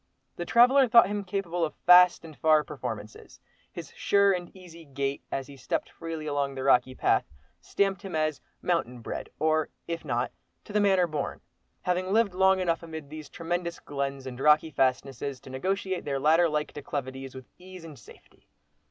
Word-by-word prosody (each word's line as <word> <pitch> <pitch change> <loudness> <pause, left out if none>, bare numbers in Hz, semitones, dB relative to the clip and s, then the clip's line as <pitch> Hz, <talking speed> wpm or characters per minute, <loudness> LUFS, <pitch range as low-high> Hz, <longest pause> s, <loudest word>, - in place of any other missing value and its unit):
The 175 - -5
traveller 255 +3 +6
thought 235 -4 +6
him 205 0 -2
capable 180 -3 -2
of 155 - -2
fast 180 -1 +7
and 155 -2 -11
far 155 0 +4
performances. 115 -8 -8 0.3
His - - -9
sure 200 0 +3
and 175 -1 -4
easy 170 -3 -13
gait, 140 -1 -3
as 135 - -2
he 140 - -12
stepped 130 -1 -3
freely 165 -2 -6
along 140 -2 -1
the 130 - -4
rocky 130 -1 +3
path, - - +2 0.4
stamped 195 -1 -1
him 195 -5 -6
as 155 -2 -1 0.2
"mountain 125 -9 -1
bred," - - -6
or, 155 0 +1 0.2
if 170 -1 -4
not 120 0 -1 0.3
"to - - -11
the 210 - +3
manner 190 -3 +4
born," 155 -4 -4 0.4
having 180 +1 -1
lived 220 -2 +2
long 190 +1 +4
enough 170 -3 0
amid 160 -3 -9
these 155 -1 -8
tremendous 170 +1 -3
glens 140 -1 -4
and 125 -1 -7
rocky 150 +3 +4
fastnesses, 135 0 -1
to 130 - -12
negotiate 190 +6 -2
their 140 -2 -2
ladder 160 +5 +4
like 150 0 -2
declivities 135 -2 -6
with 130 -1 -9
ease 185 -1 -12
and 150 -6 -11
safety. 100 - -19
160 Hz, 180 wpm, -27 LUFS, 140-180 Hz, 0.4 s, fast